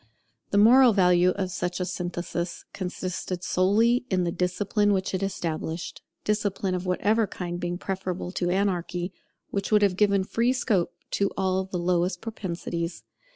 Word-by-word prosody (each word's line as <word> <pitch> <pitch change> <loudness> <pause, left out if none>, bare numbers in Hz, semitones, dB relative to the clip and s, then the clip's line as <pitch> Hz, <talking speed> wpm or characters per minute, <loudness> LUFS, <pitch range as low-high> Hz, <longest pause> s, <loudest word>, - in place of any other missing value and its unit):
The 200 - +1
moral 240 +3 +7
value 180 -2 +4
of 190 -2 -2
such 175 +1 -2
a 180 - 0
synthesis 175 -1 -4
consisted 185 -1 -4
solely 225 +8 +2
in 185 -2 +1
the 170 - 0
discipline 200 +4 +1
which 190 0 -1
it 185 - -1
established; 165 -3 -3 0.2
discipline 205 -2 0
of 180 0 -3
whatever 210 +4 +2
kind 175 -2 -5
being 175 0 -2
preferable 185 -1 -4
to 175 -1 -1
anarchy, 180 -1 -1 0.4
which 200 +1 -2
would 210 -1 +5
have 195 -3 +3
given 200 -1 +3
free 235 +6 +1
scope 210 -9 +1 0.2
to 200 -1 +1
all 190 0 +1
the 190 -1 -4
lowest 175 +1 +1
propensities. 170 -5 -4
185 Hz, 155 wpm, -26 LUFS, 180-200 Hz, 0.4 s, moral